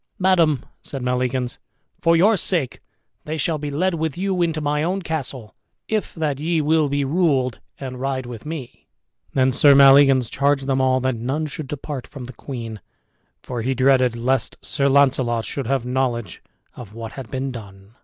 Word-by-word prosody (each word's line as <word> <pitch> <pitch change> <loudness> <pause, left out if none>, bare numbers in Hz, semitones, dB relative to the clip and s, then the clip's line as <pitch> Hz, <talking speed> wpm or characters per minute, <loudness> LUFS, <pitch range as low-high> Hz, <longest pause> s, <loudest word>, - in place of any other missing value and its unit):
"Madame," 175 -7 +3 0.2
said 135 -3 -6
Maleagans, 125 0 -1 0.4
"for 165 0 +3
your 205 +7 +5
sake 170 -7 0 0.5
they 155 +1 -3
shall 155 +1 0
be 145 0 -4
led 175 +6 0
with 160 -2 -2
you 190 -1 -1
into 165 -2 0
my 150 0 0
own 185 +4 -1
castle, 135 -8 -5 0.3
if 215 -1 -2
that 150 -4 -2
ye 165 +2 0
will 155 0 +2
be 140 0 0
ruled, 135 -6 +1 0.2
and 130 -2 -6
ride 135 -1 -2
with 120 -2 -8
me." 150 -5 -8 0.5
Then 130 0 +3
Sir 140 +2 +6
Maleagans 135 -2 +6
charged 140 -1 +1
them 135 -1 +1
all 130 0 +3
that 130 +1 +1
none 135 +7 -2
should 150 -1 -6
depart 145 -1 -6
from 135 - -9
the 125 +1 -9
queen, 115 -5 -7 0.6
for 125 -2 -4
he 130 +3 -1
dreaded 130 -2 +3
lest 125 +1 -1
Sir 140 0 +1
Launcelot 130 -4 +2
should 135 -4 -4
have 135 -2 0
knowledge 125 -6 -2 0.3
of 110 -3 -11
what 115 -1 -6
had 130 -5 -9
been 135 0 -3
done. 100 -3 -11
135 Hz, 175 wpm, -22 LUFS, 125-155 Hz, 0.6 s, Sir